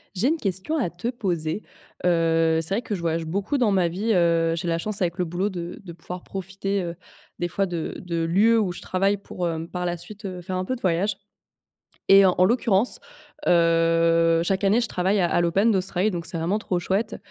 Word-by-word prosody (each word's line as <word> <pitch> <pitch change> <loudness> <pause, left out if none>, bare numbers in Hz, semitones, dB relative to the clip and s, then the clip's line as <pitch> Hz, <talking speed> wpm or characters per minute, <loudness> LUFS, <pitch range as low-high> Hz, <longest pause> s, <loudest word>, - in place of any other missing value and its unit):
J'ai 220 +8 +1
une 325 - +1
question 195 - -2
à 240 - 0
te 180 +8 -4
poser, 185 -6 -2 0.4
heu, 165 -1 +3
c'est 165 +4 -2
vrai 225 - 0
que 215 - -3
je 180 - -6
voyage 165 -1 -1
beaucoup 200 - -1
dans 220 -4 +3
ma 185 -3 +3
vie, 200 +7 -2
heu, 170 -2 +3
j'ai 170 +1 -4
la 165 -1 +1
chance, 210 +3 -3
avec 175 -2 0
le 180 - +1
boulot, 175 +4 -1
de 175 -3 -6
de 175 -3 -9
pouvoir 175 +2 -8
profiter, 195 +1 -3
heu, 170 0 -5 0.4
des 175 - -1
fois, 195 +3 0
de 170 -3 -4
de 170 -3 -3
lieux 215 +7 +4
où 200 -4 0
je 175 - -9
travaille 195 +2 +1
pour, 185 -2 -5
heu, 165 -1 -3
par 180 -1 -3
la 175 0 -1
suite, 205 +5 -10
heu, 185 -2 -5
faire 185 +1 -5
un 185 - -2
peu 255 - -2
de 240 - -12
voyages 190 +3 +1 1.0
et 195 0 +8
en 180 -1 +3
l'occurrence, 225 +1 +2 0.5
heu, 165 0 +3
chaque 190 +3 -1
année, 210 +5 +4
je 235 - -1
travaille 190 +2 0
à 175 - +3
à - - +3
l'Open 195 +7 +3
d'Australie, 190 +1 +1
donc 170 -2 -4
c'est 170 +1 -4
vraiment 175 +6 0
trop 185 -4 -2
chouette 205 +5 -1
180 Hz, 220 wpm, -24 LUFS, 170-200 Hz, 1.0 s, et